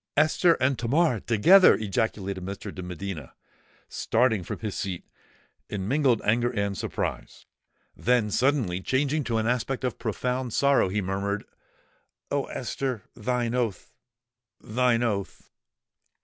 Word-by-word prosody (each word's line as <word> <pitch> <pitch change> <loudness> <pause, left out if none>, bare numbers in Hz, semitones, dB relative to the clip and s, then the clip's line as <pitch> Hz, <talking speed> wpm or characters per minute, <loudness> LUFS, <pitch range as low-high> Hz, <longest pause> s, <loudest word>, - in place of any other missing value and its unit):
"Esther 155 +3 +4
and 130 -1 0
Tamar 130 +1 +2
together!" 170 - +6
ejaculated 100 -3 -2
Mr. 100 +1 -6
de 95 - -7
Medina, 90 -5 -6 0.5
starting 115 -4 +1
from - - -5
his 105 -3 -4
seat, 95 -3 -4 0.7
in 95 -2 -3
mingled 135 -4 +2
anger 120 +3 +2
and 100 -4 -2
surprise: - - -4 0.5
then, 120 -3 +1
suddenly 125 -8 +1
changing 140 +7 0
to 115 -3 -1
an 110 - 0
aspect 125 +2 -1
of 125 -3 -2
profound 125 +2 -2
sorrow, 140 -8 +3
he 105 +1 -1
murmured, 100 +2 -2 0.9
"Oh! - - 0
Esther! 130 -7 -4
thine 120 +1 -1
oath—thine 120 +1 -3
oath!" 100 -5 -3
115 Hz, 120 wpm, -26 LUFS, 100-125 Hz, 0.9 s, together